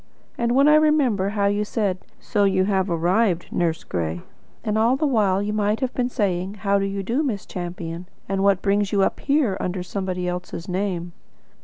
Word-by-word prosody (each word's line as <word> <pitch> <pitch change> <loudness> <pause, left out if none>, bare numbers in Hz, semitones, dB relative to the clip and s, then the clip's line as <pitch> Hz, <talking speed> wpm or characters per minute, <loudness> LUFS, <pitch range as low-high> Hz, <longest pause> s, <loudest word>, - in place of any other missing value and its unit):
And 235 0 0
when 275 +3 +5
I 300 - +7
remember 290 -11 +3
how 205 -1 0
you 205 +1 +1
said: 205 -3 -1 0.2
'So 205 -3 0
you 190 -1 +3
have 190 -1 +1
arrived, 175 +2 +1
Nurse 165 -2 0
Gray?' 85 -1 -3 0.4
and 215 - -1
all 230 +4 +3
the 305 - 0
while 205 -8 +2
you 210 +1 -2
might 210 +1 +1
have 260 -2 -2
been 250 -1 0
saying. 195 -4 -1
'How 200 -1 +1
do 195 - 0
you 195 0 -3
do, 235 +9 0
Miss 235 -10 -2
Champion? 175 -1 -6 0.2
And 195 0 -1
what 195 -2 +3
brings 200 0 +1
you 200 -2 +3
up - - 0
here 275 -9 +1
under 180 0 -2
somebody 185 -1 -3
else's 180 -1 -5
name?" 180 -2 -2
200 Hz, 195 wpm, -23 LUFS, 180-220 Hz, 0.4 s, I